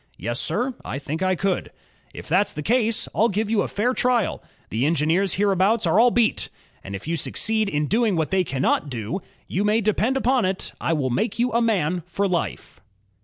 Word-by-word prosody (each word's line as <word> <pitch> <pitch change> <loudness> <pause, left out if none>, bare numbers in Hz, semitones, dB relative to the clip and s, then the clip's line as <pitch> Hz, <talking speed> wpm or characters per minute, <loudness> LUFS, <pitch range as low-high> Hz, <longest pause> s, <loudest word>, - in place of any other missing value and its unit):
"Yes, 120 +7 -3
sir, 245 +11 0
I - - -4
think 150 +4 -5
I 185 0 +2
could." 190 +1 -1 0.4
"If - - -10
that's 185 +6 +2
the 150 - -5
case, 230 +2 +1
I'll 225 +2 +3
give 210 +2 -1
you 215 -3 +3
a - - -1
fair 240 +5 0
trial.... 245 -4 +1 0.3
The 120 +6 +1
engineers 165 +5 +1
hereabouts 200 +2 +2
are 170 +5 +3
all 245 +2 +6
beat; 235 -2 +1 0.3
and 100 0 -6
if 100 - -8
you 165 - 0
succeed 220 +5 +1
in 150 -2 0
doing 220 +3 +1
what 160 +1 -1
they 190 -1 +3
cannot 140 -1 0
do, 120 - -4 0.3
you 190 - -1
may 210 +2 +3
depend 220 +4 +1
upon 260 -1 +2
it, 190 0 -2
I - - 0
will 135 -5 -1
make 175 - -1
you 245 +1 +1
a 235 - +2
man 180 -7 +1
for 200 +3 -1
life." 170 - -3
195 Hz, 205 wpm, -23 LUFS, 160-225 Hz, 0.4 s, all